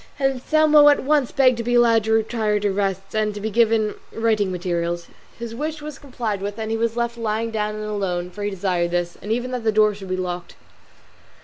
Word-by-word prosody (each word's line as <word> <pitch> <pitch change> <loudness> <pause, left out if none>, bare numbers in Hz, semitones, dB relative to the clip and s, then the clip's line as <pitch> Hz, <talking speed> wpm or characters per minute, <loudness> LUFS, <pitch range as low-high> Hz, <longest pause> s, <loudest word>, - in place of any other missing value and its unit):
Anselmo 295 +3 +4
at 290 - +3
once 285 -2 +2
begged 255 -3 +4
to 235 - -3
be 245 +1 0
allowed 230 -2 +4
to 220 - -1
retire 220 -1 +1
to 205 -1 0
rest, 195 -1 -2
and 215 -1 0
to - - -5
be 215 +2 -3
given 225 -1 +2 0.2
writing 220 -4 +1
materials. 175 -1 -2 0.3
His 235 -1 -6
wish 305 +5 -4
was 300 -2 -8
complied 235 -7 -4
with 205 +1 -4
and 220 0 -4
he 225 - 0
was 230 +1 -1
left 235 0 -2
lying 225 0 -1
down 210 -1 -2
and 215 0 -5
alone, 185 -4 -2
for 205 - -9
he 205 - -1
desired 180 -3 -1
this, 175 0 -2
and 210 - -5
even 245 +2 -1
that 250 -2 -3
the 220 - +2
door 215 0 +4
should 195 -2 -10
be 185 - -1
locked. 180 -1 -5
215 Hz, 220 wpm, -22 LUFS, 195-235 Hz, 0.3 s, Anselmo